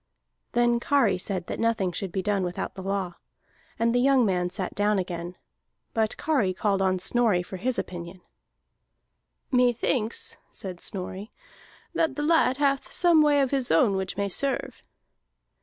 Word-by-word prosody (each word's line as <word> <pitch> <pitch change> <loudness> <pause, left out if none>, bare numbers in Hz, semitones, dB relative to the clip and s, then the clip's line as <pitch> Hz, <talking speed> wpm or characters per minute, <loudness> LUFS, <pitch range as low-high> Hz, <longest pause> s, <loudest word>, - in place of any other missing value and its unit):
Then 240 0 +3
Kari 235 -8 +2
said 185 -2 -2
that - - -5
nothing 225 -5 +1
should 185 +1 -4
be 190 +1 -2
done 205 -1 +1
without 175 -1 -3
the 190 - -8
law. 190 -2 -3 0.6
And 230 +1 +2
the 245 - +3
young 265 -2 +4
man 180 -3 0
sat 185 0 -3
down 205 0 +1
again. 175 -1 -4 0.6
But 220 -2 0
Kari 245 -13 +1
called 200 -1 0
on 185 -1 +2
Snorri 210 -1 +1
for 190 - -8
his 245 +6 -1
opinion. 175 +1 -6 1.3
"Methinks," 245 -2 +1
said 185 -3 -8
Snorri, 190 +3 -5 0.6
"that 320 -4 +1
the 295 - -2
lad 300 -5 +3
hath 275 -1 0
some 340 -3 +4
way 295 -1 +4
of 270 - 0
his 270 -3 0
own 195 +5 +4
which 190 0 -3
may 200 - 0
serve." 270 +8 -2
205 Hz, 155 wpm, -26 LUFS, 185-250 Hz, 1.3 s, young